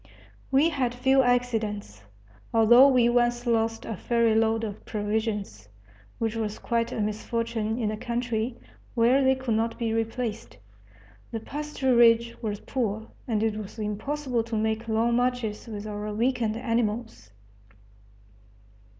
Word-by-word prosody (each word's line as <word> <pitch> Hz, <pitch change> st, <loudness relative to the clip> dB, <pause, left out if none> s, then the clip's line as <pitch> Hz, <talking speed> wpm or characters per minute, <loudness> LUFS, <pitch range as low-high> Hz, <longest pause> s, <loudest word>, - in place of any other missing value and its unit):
We 280 Hz, +5 st, +4 dB
had 255 Hz, -6 st, -1 dB
few 265 Hz, +2 st, +4 dB
accidents, 225 Hz, -, -1 dB, 0.5 s
although 240 Hz, +4 st, +7 dB
we 250 Hz, -3 st, +4 dB
once 240 Hz, 0 st, +2 dB
lost 225 Hz, -1 st, 0 dB
a 225 Hz, -, -4 dB
ferry 235 Hz, +2 st, +2 dB
load 225 Hz, 0 st, +2 dB
of 205 Hz, -2 st, -5 dB
provisions, 205 Hz, -, -3 dB, 0.5 s
which 225 Hz, -1 st, -2 dB
was 215 Hz, -2 st, -3 dB
quite 230 Hz, -1 st, -1 dB
a -, -, -4 dB
misfortune 220 Hz, +1 st, -2 dB
in 220 Hz, -3 st, -1 dB
a 215 Hz, -, -4 dB
country 235 Hz, 0 st, -2 dB, 0.4 s
where 245 Hz, +4 st, +4 dB
they 265 Hz, 0 st, +4 dB
could 260 Hz, -3 st, -2 dB
not 225 Hz, +1 st, 0 dB
be 230 Hz, -2 st, -1 dB
replaced. 225 Hz, -, -3 dB, 0.7 s
The 225 Hz, -, -4 dB
pasturage 240 Hz, -4 st, +2 dB
was 210 Hz, -2 st, -3 dB
poor, 220 Hz, -4 st, -3 dB, 0.2 s
and 220 Hz, -3 st, 0 dB
it 220 Hz, -1 st, 0 dB
was 215 Hz, 0 st, -7 dB
impossible 240 Hz, +5 st, -2 dB
to 230 Hz, -1 st, -4 dB
make 220 Hz, +1 st, -1 dB
long 230 Hz, +2 st, +2 dB
marches 245 Hz, -3 st, -1 dB
with 210 Hz, -2 st, -6 dB
our 210 Hz, 0 st, -4 dB
weakened 230 Hz, 0 st, 0 dB
animals. 230 Hz, -, -2 dB
230 Hz, 135 wpm, -26 LUFS, 215-245 Hz, 0.7 s, although